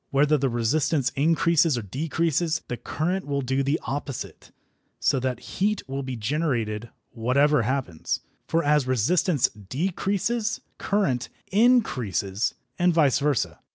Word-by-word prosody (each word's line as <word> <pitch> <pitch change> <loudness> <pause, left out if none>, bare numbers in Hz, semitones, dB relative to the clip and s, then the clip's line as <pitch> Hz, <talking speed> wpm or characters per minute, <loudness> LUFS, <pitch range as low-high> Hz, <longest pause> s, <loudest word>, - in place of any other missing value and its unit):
Whether 145 +2 +3
the 135 -2 +1
resistance 130 +3 +1
increase 165 +2 +3
or 120 - -3
decrease, 160 - 0
the 120 - -3
current 180 +8 -2
will 140 -1 -1
do 135 +2 0
the 140 +3 +1
opposite, 140 -1 -5 0.5
so 135 - +2
that 125 -2 -2 0.2
heat 210 -4 +1
will 135 +1 -3
be 130 -1 -4
generated 115 -3 -1 0.2
whatever 130 +4 +2
happens. 115 - -2 0.3
For 165 +1 +1
as 150 -2 +3
resistance 135 - +2
decreases 195 - -2 0.2
current 180 -12 0 0.2
increases, 130 - +2 0.2
and 175 0 +4
vice 155 -6 +3
versa. 145 -3 0
140 Hz, 125 wpm, -25 LUFS, 125-165 Hz, 0.5 s, and